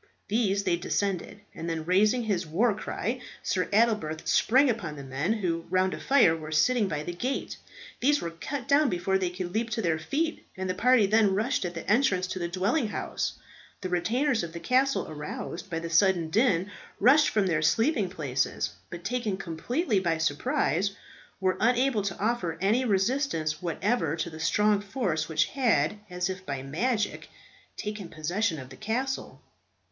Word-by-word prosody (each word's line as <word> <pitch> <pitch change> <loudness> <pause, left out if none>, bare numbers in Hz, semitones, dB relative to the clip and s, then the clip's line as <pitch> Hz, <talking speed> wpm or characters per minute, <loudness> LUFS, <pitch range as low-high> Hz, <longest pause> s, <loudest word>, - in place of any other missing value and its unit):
These 200 -2 +1
they 170 - +1
descended, 195 +2 -2
and 165 - -5
then, 160 -1 -3
raising 210 +7 +3
his 190 -6 -1
war 210 +9 +2
cry, 230 +4 -3 0.2
Sir 185 -1 0
Adelbert 210 -8 +1
sprang 260 +6 +4
upon 225 - -2
the 140 - -8
men 135 +8 -2
who, 170 -6 -2
round 185 +1 +2
a - - -5
fire, 250 -12 +4
were 155 -1 -8
sitting 210 +8 +3
by 150 -4 -3
the 175 - -4
gate. 255 +10 -3 0.4
These 290 +3 +3
were 170 - -4
cut 250 +10 -5
down 285 0 +4
before 190 +1 0
they 185 -2 0
could 180 0 -5
leap 230 +1 0
to 225 0 -2
their 165 -2 +1
feet, 310 - -2
and 190 0 -3
the 185 - 0
party 245 +3 +4
then 205 -1 +3
rushed 220 +1 0
at 175 0 -4
the 165 - -7
entrance 210 -5 +3
to 185 0 -5
the 170 - -1
dwelling 200 - 0
house. 210 - -3 0.5
The 185 - -3
retainers 235 +9 +1
of 170 -1 -6
the 170 - -6
castle, 265 +6 +2
aroused 155 +3 -6
by 165 - -2
the 165 0 -4
sudden 170 -2 +3
din, 205 -3 +2 0.3
rushed 290 +7 +6
from 210 -2 +1
their 165 -5 +1
sleeping 215 - +2
places, 140 -8 -1 0.2
but 175 0 -8
taken 220 -2 -1
completely 210 - -1
by 170 -3 0
surprise, 160 +4 0 0.4
were 185 -1 +1
unable 245 0 +2
to 200 0 -3
offer 200 -7 -1
any 210 +8 +2
resistance 195 - 0
whatever 175 -1 0
to 165 +1 -3
the 160 - -9
strong 210 +5 +2
force 195 - -2
which 155 -1 +2
had, 210 - +1
as 180 0 -1
if 185 0 -5
by 140 -6 -4
magic, 210 - -1 0.5
taken 210 -4 -5
possession 170 +4 -1
of 130 -2 -9
the 130 - -11
castle. 250 +5 -3
190 Hz, 180 wpm, -28 LUFS, 165-230 Hz, 0.5 s, rushed